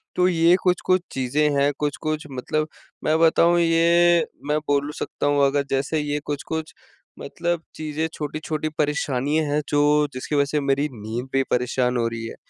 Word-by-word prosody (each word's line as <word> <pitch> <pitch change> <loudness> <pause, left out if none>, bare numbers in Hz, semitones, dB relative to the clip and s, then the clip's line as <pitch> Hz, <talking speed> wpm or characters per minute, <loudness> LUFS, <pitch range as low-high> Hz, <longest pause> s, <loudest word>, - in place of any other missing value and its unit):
तो 180 0 +3
ये 170 0 +4
कुछ-कुछ 185 0 +2
चीज़ें 140 +4 +1
हैं। 140 +1 +3
कुछ-कुछ 150 +1 -2
मतलब 155 +4 -2 0.4
मैं 155 +1 +2
बताऊँ 170 +1 +4
ये 170 0 +4 0.2
मैं 150 - +2
बोलूँ 145 +1 +1
सकता - - -3
हूँ 145 -1 +3
अगर 140 +1 +1
जैसे 140 +3 0
ये 150 0 -2
कुछ-कुछ 155 +2 -4 0.5
मतलब 175 -1 -3
चीज़ें 155 +1 -3
छोटी-छोटी 155 +1 -3
परेशानियाँ 150 0 0
हैं 150 +1 0
जो 145 0 +2 0.3
जिसकी 130 +4 -4
वज़ह 140 0 +3
से 150 - +1
मेरी 140 +2 +1
नींद 115 +3 -5
भी 135 0 +3
परेशान 125 0 +1
हो 115 -1 +1
रही 115 0 -6
है, - - -8
150 Hz, 165 wpm, -23 LUFS, 140-160 Hz, 0.5 s, ये